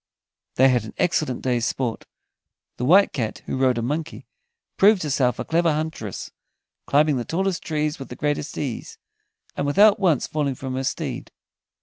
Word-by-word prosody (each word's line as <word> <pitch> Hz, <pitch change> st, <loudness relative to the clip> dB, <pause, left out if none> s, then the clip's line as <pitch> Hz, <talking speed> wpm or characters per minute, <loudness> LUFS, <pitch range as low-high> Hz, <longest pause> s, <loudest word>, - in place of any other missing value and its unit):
They 130 Hz, +1 st, +5 dB
had 125 Hz, -3 st, +2 dB
an 110 Hz, -, -10 dB
excellent 155 Hz, -7 st, 0 dB
day's 120 Hz, -2 st, +1 dB
sport. 125 Hz, -4 st, -3 dB, 0.7 s
The 125 Hz, -, -2 dB
White 190 Hz, +8 st, +5 dB
Cat, 115 Hz, -5 st, -3 dB
who -, -, -3 dB
rode 130 Hz, -2 st, +2 dB
a 115 Hz, -, -1 dB
monkey, 155 Hz, +6 st, -4 dB, 0.5 s
proved 200 Hz, -2 st, +5 dB
herself 130 Hz, -5 st, +1 dB
a -, -, -4 dB
clever 170 Hz, 0 st, +2 dB
huntress, 150 Hz, -, -4 dB, 0.6 s
climbing 150 Hz, 0 st, +3 dB
the 120 Hz, -, -2 dB
tallest 185 Hz, +5 st, -1 dB
trees 150 Hz, -1 st, -2 dB
with 135 Hz, -, -8 dB
the 125 Hz, -, -7 dB
greatest 145 Hz, +2 st, -2 dB
ease, 130 Hz, -6 st, -5 dB, 0.6 s
and 140 Hz, -, -2 dB
without 205 Hz, +8 st, +5 dB
once 170 Hz, -9 st, +2 dB
falling 145 Hz, -3 st, -2 dB
from 130 Hz, 0 st, -6 dB
her 130 Hz, +1 st, -2 dB
steed. -, -, -4 dB
145 Hz, 165 wpm, -23 LUFS, 125-160 Hz, 0.7 s, They